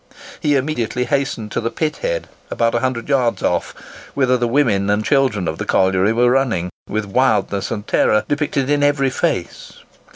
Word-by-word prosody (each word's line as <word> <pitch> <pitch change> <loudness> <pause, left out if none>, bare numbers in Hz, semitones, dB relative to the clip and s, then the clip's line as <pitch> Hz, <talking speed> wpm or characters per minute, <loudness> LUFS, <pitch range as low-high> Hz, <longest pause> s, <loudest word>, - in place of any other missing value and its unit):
He 145 -1 +1
immediately 125 -3 -1
hastened 120 -5 -2
to - - -2
the 115 - -1
pit 155 +6 -2
head, - - -3 0.2
about 115 -1 0
a 120 - +1
hundred 125 -1 -2
yards 130 -5 +1
off, - - -1 0.4
whither 130 -2 +2
the 120 -1 0
women 115 -7 +1
and 105 +1 +1
children 130 -10 +1
of - - -3
the - - -2
colliery 95 +2 +2
were 120 +2 +3
running, 115 -10 0 0.2
with 110 0 -2
wildness 100 -2 +1
and 105 -1 -4
terror 110 - +2
depicted 145 -2 -1
in 145 0 +1
every 145 -2 +2
face. - - -3
125 Hz, 175 wpm, -19 LUFS, 110-140 Hz, 0.4 s, were